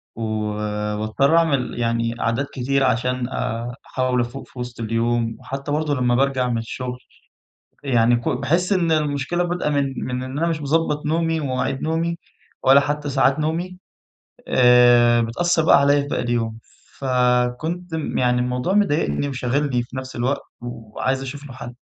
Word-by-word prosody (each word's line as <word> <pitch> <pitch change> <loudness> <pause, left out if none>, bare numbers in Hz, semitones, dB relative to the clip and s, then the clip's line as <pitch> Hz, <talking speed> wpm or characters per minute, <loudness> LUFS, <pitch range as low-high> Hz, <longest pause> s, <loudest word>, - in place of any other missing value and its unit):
و 115 - -7
وباضطَر 105 +5 0
أعمِل 140 -8 +1
يعني 115 0 0
عادات 120 +5 0
كتير 135 +1 0
عشان 125 0 0
آآ، 120 -1 -3
أحاول 130 -1 0
أفوق 120 +3 -6
في 125 - -13
وسط 120 -1 -6
اليوم 115 0 0
وحتى 140 +2 -6
برضه 150 0 0
لما 125 -2 +1
بارجَع 130 -1 +1
من 120 - 0
الشغل 125 +2 -5 0.8
يعني 120 -3 +3
ك 120 - -2
باحِس 170 +9 +1
إن 170 -3 +1
المشكلة 150 +2 0
بادئة 175 -3 -1
من 140 -2 0
من 125 0 -3
إن 130 +2 -6
أنا 165 +3 +1
مش 165 -2 -1
مظبَّط 150 0 0
نومي 165 +1 0
ومواعيد 135 -1 -2
نومي، 165 +2 -1 0.5
ولا 135 +1 +7
حتى 145 +1 -2
ساعات 135 +1 +2
نومي 170 +4 -2 0.7
آآ، 120 -1 +6
بتأثر 160 +8 +1
بقى 150 - +6
عليَّ 145 +1 +4
لباقي 140 0 -2
اليوم. 115 -2 -1 0.4
فكنت 125 +7 0
يعني 125 -5 0
الموضوع 125 +8 -1
مضايقني 145 - +1
وشاغلني 130 0 0
في 120 +2 -10
نفْس 130 0 -6
الوقت، 130 +4 0 0.2
وعايز 120 +2 -3
أشوف 140 +2 -7
له 135 - -9
حل. 125 -1 -8
130 Hz, 155 wpm, -22 LUFS, 120-145 Hz, 0.8 s, ولا